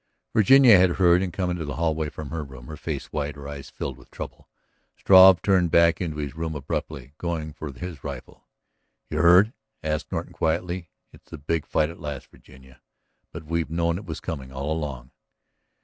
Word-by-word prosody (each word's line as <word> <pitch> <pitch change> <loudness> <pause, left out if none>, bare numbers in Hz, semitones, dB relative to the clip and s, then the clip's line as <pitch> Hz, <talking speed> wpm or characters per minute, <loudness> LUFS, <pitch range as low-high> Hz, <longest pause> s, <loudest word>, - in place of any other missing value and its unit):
Virginia 115 0 +7
had 90 -1 +4
heard 90 -1 +4
and 95 -2 -2
came 90 0 -2
into 90 -2 -3
the 75 -2 -5
hallway 80 -2 -1
from 75 -1 -8
her 80 -2 -3
room, 65 -3 -12
her 75 - -8
face - - -6
white, 75 -1 -3
her 70 -1 -9
eyes 70 -1 -8
filled 65 -2 -6
with - - -19
trouble. - - -9 0.5
Struve 95 -1 +7
turned 95 -4 +3
back 85 +1 +4
into 80 -4 -3
his 75 -2 -4
room 80 -1 -4
abruptly, 70 -1 -5
going 80 -3 -3
for 75 -1 -7
his 70 +3 -8
rifle. 70 -4 -9 0.6
"You 75 - -1
heard?" 90 +7 +6 0.3
asked 75 0 -3
Norton - - -4
quietly. 85 +2 -2 0.2
"It's - - -19
the - - -8
big 75 +2 -2
fight 75 +1 +1
at 85 - -13
last, 75 -3 -7
Virginia. 65 -1 -18 0.5
But 80 - -8
we've 85 +1 -2
known 85 +1 0
it 105 - -11
was 80 -3 -6
coming 70 -7 -6
all 70 +4 -3
along." 70 -5 -5
80 Hz, 190 wpm, -25 LUFS, 70-85 Hz, 0.6 s, Virginia